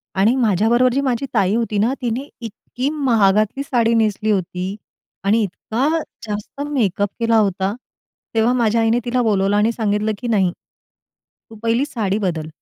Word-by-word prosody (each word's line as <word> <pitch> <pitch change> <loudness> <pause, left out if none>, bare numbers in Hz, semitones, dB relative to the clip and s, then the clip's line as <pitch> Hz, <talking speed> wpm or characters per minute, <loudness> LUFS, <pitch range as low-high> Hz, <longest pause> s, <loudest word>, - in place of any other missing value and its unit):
आणि 210 +6 +3
माझ्याबरोबर 235 +2 +3
जी 275 - +1
माझी 265 -1 -1
ताई 200 -2 +2
होती 225 -3 -1
ना, 235 +5 +2
तिने 245 +3 -2
इतकी 240 +4 -4
महागातली 225 -4 +2
साडी 235 -4 +1
नेसली 215 -1 +1
होती 185 0 -2 0.5
आणि 215 +3 +3
इतका 225 +7 -2 0.4
जास्त 210 +6 -5
मेकअप 205 -7 0
केला 230 -1 +3
होता. 195 -1 +1 0.6
तेव्हा 225 +2 +3
माझ्या 230 -2 +2
आईने 225 +2 +2
तिला 250 +1 +1
बोलावलं 205 -3 +2
आणि 215 +2 +3
सांगितलं 215 -1 0
की 245 - -5
"नाही. 195 -6 +2 1.0
तू 225 - -12
पहिली 230 +4 +2
साडी 210 -7 -2
बदल. 170 -6 -2
225 Hz, 150 wpm, -20 LUFS, 200-240 Hz, 1.0 s, आणि